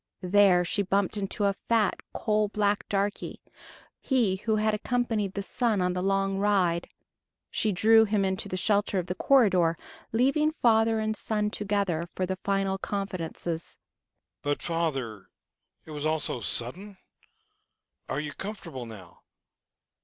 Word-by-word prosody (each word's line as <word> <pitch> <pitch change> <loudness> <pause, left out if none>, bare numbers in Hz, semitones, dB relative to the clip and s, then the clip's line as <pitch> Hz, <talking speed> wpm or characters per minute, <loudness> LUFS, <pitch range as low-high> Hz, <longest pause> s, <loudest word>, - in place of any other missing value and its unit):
There 185 -1 +5
she 205 +4 0
bumped 200 +1 0
into 205 0 -2
a 200 - +3 0.2
fat, 225 -4 +2
coal 215 -1 +1
black 205 0 0
darky, 200 +1 -2 0.6
he 235 -8 +1
who 220 +3 0
had 215 0 +1
accompanied 220 -3 -1
the 200 - -2
son 230 0 0
on 180 0 +1
the 180 - -2
long 195 0 +1
ride. 185 -4 +1 0.6
She 215 - +1
drew 225 +4 +5
him 205 -2 +1
into 190 +1 -2
the 185 - -3
shelter 200 +1 +1
of 180 - 0
the 180 - -3
corridor, 185 -9 +3 0.3
leaving 275 +7 +2
father 225 -5 +3
and 215 0 -1
son 210 -1 -1
together 195 -6 -1
for 185 - 0
the 190 +1 -3
final 195 0 -1
confidences. 175 -4 -4 0.6
"But, 145 0 -2
father, 135 - -2 0.6
it 160 - -11
was 150 -1 -5
all 155 +1 +2
so 135 - -1
sudden? 185 - -5 1.1
Are 135 - -1
you 150 -1 -4
comfortable 195 - -7
now? 110 -4 -12
195 Hz, 145 wpm, -28 LUFS, 175-215 Hz, 1.1 s, There